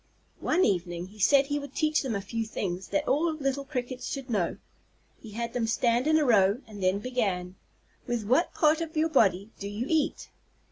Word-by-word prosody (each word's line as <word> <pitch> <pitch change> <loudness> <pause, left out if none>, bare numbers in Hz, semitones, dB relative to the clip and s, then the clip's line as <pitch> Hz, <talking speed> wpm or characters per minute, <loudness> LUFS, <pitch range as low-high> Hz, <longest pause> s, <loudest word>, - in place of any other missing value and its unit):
One 370 - +2
evening 175 -2 -1
he 210 +2 -16
said 275 +6 +5
he 290 +1 -1
would 285 0 -9
teach 310 -1 +2
them 255 -6 -2
a 200 - -2
few 225 +3 -3
things 190 -4 -4
that 300 0 -1
all 320 +4 +2
little 280 -2 -2
Crickets 255 -2 -4
should 270 -3 -5
know. 190 -6 0 0.6
He 225 - -10
had 235 +1 -4
them 240 -2 0
stand 235 +3 +1
in 315 0 +4
a 305 - +2
row, 205 -2 +4
and 210 -3 -10
then 185 +1 +2
began: 200 -7 -2 0.5
"With 240 -2 -1
what 260 - +2
part 310 0 +3
of 320 -1 -5
your 320 +1 +2
body 200 - +2
do 200 - -5
you 210 +4 -3
eat?" 315 -2 0
240 Hz, 200 wpm, -28 LUFS, 200-285 Hz, 0.6 s, said